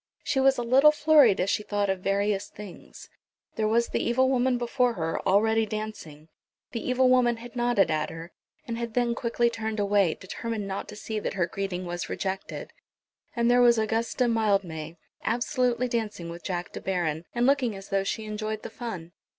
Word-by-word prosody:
She 265 Hz, -, 0 dB
was 270 Hz, 0 st, +4 dB
a 240 Hz, -, -1 dB
little 265 Hz, +5 st, +6 dB
flurried 300 Hz, -8 st, +5 dB
as 195 Hz, -, +1 dB
she 205 Hz, -, 0 dB
thought 205 Hz, -1 st, -1 dB
of 190 Hz, -1 st, -1 dB
various 200 Hz, +1 st, 0 dB
things. 205 Hz, -3 st, -11 dB, 0.5 s
There 215 Hz, -, 0 dB
was 235 Hz, +2 st, +2 dB
the -, -, -1 dB
evil 260 Hz, +2 st, +2 dB
woman 255 Hz, -1 st, +2 dB
before 245 Hz, 0 st, +1 dB
her, 165 Hz, -5 st, -2 dB
already 220 Hz, +3 st, +3 dB
dancing. 210 Hz, -9 st, -6 dB, 0.4 s
The 230 Hz, -, -4 dB
evil 255 Hz, +1 st, +2 dB
woman 250 Hz, -2 st, +4 dB
had 240 Hz, +1 st, -11 dB
nodded 240 Hz, -7 st, +2 dB
at 155 Hz, -1 st, 0 dB
her, 165 Hz, +2 st, -9 dB, 0.4 s
and 230 Hz, -1 st, -3 dB
had 235 Hz, -2 st, -5 dB
then 240 Hz, -1 st, +2 dB
quickly 235 Hz, 0 st, 0 dB
turned 220 Hz, -2 st, -3 dB
away, 200 Hz, -4 st, +2 dB
determined 215 Hz, +2 st, -5 dB
not 195 Hz, 0 st, -4 dB
to 210 Hz, -, -9 dB
see 215 Hz, +1 st, -4 dB
that 210 Hz, -, -4 dB
her 180 Hz, -3 st, +2 dB
greeting 185 Hz, 0 st, -4 dB
was 175 Hz, 0 st, -4 dB
rejected; 190 Hz, 0 st, -4 dB, 0.6 s
and 235 Hz, -1 st, +1 dB
there 245 Hz, 0 st, +5 dB
was 240 Hz, -1 st, +6 dB
Augusta 225 Hz, +3 st, 0 dB
Mildmay 195 Hz, -8 st, 0 dB, 0.3 s
absolutely 245 Hz, +1 st, 0 dB
dancing 215 Hz, -8 st, -3 dB
with 170 Hz, +1 st, -9 dB
Jack 180 Hz, -1 st, -4 dB
De -, -, -7 dB
Baron, 170 Hz, -4 st, -2 dB
and 240 Hz, 0 st, +2 dB
looking 260 Hz, -5 st, +2 dB
as 195 Hz, 0 st, -10 dB
though 195 Hz, 0 st, +1 dB
she 215 Hz, +2 st, -3 dB
enjoyed 215 Hz, 0 st, -4 dB
the -, -, -7 dB
fun. 185 Hz, -9 st, -6 dB
220 Hz, 190 wpm, -27 LUFS, 195-240 Hz, 0.6 s, little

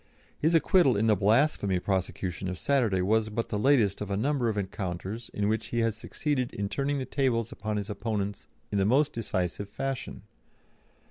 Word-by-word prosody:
His 160 Hz, +3 st, +3 dB
acquittal 165 Hz, -, +4 dB
in 110 Hz, -, +2 dB
the 110 Hz, -1 st, +5 dB
blasphemy 105 Hz, -1 st, +2 dB
prosecution 95 Hz, -1 st, -2 dB
of 90 Hz, -1 st, -3 dB
Saturday 115 Hz, -10 st, +1 dB
was 110 Hz, +3 st, +2 dB
but 115 Hz, +2 st, -3 dB
the 105 Hz, -, -1 dB
latest 115 Hz, -6 st, +3 dB
of 105 Hz, -, -4 dB
a 100 Hz, -, -1 dB
number 130 Hz, +1 st, +1 dB
of 105 Hz, -, -2 dB
encounters 95 Hz, +2 st, -4 dB
in 100 Hz, 0 st, -1 dB
which 110 Hz, +1 st, 0 dB
he 120 Hz, 0 st, -1 dB
has 115 Hz, -2 st, +1 dB
succeeded 130 Hz, +3 st, -2 dB
in 100 Hz, -1 st, -2 dB
turning 140 Hz, +3 st, -1 dB
the 130 Hz, -, -2 dB
tables 120 Hz, -5 st, 0 dB
upon 110 Hz, -1 st, -3 dB
his 100 Hz, -1 st, -3 dB
opponents 105 Hz, -1 st, -3 dB, 0.2 s
in 100 Hz, -, +1 dB
the -, -, +3 dB
most 140 Hz, +7 st, +3 dB
decisive 100 Hz, -3 st, -2 dB
fashion. 135 Hz, +3 st, -4 dB
110 Hz, 185 wpm, -28 LUFS, 100-130 Hz, 0.2 s, the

